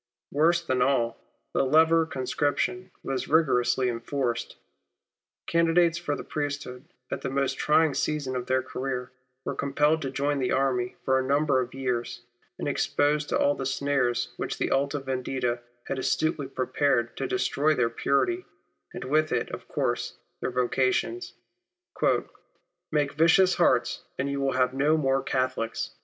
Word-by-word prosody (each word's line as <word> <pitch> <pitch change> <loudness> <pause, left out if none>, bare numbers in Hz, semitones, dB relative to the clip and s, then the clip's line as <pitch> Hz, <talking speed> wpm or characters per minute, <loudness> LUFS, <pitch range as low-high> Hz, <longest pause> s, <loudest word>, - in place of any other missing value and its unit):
Worse 170 +4 +3
than 130 -4 0
all, 125 -3 +1 0.3
the - - +2
leva 160 +4 +5
or 165 - +3
conscription 150 +7 -1
was 130 -1 -2
rigorously 130 -5 +3
enforced. 120 0 -2 0.9
Candidates 170 0 +3
for 145 -4 -2
the - - -6
priesthood 145 -3 -4 0.3
at - - -3
the - - -3
most 135 0 -1
trying 155 0 +3
season 145 -4 -1
of 125 -1 -3
their 130 0 +1
career, 130 -1 -4 0.3
were - - -2
compelled 150 +3 +1
to 135 - -2
join 140 +2 -1
the 130 - 0
army 130 -2 0
for 130 0 +3
a - - 0
number 140 -1 +3
of 125 +1 -6
years, 125 -2 -3 0.3
and - - -4
exposed 150 +1 +1
to - - +2
all 145 - +3
the 135 - -5
snares 135 -3 0
which - - -3
the - - -1
Alta 140 +2 +1
Vendita 130 -2 -2 0.2
had 135 - -3
astutely 140 +2 0
prepared 130 -2 0
to 135 - -2
destroy 145 +5 +1
their 115 -3 +1
purity, 350 - +1 0.5
and - - -5
with 155 +4 +1
it, - - -1
of - - -7
course, - - -2 0.2
their - - -1
vocations; 130 - 0 0.8
" 175 0 -10
make 145 -2 +1
vicious 170 +5 +5
hearts, - - +2
and 140 +1 -1
you 140 0 -2
will 135 0 +1
have 130 0 +2
no 145 +4 +3
more 135 -2 +1
Catholics." 130 -4 -2
135 Hz, 155 wpm, -27 LUFS, 130-150 Hz, 0.9 s, leva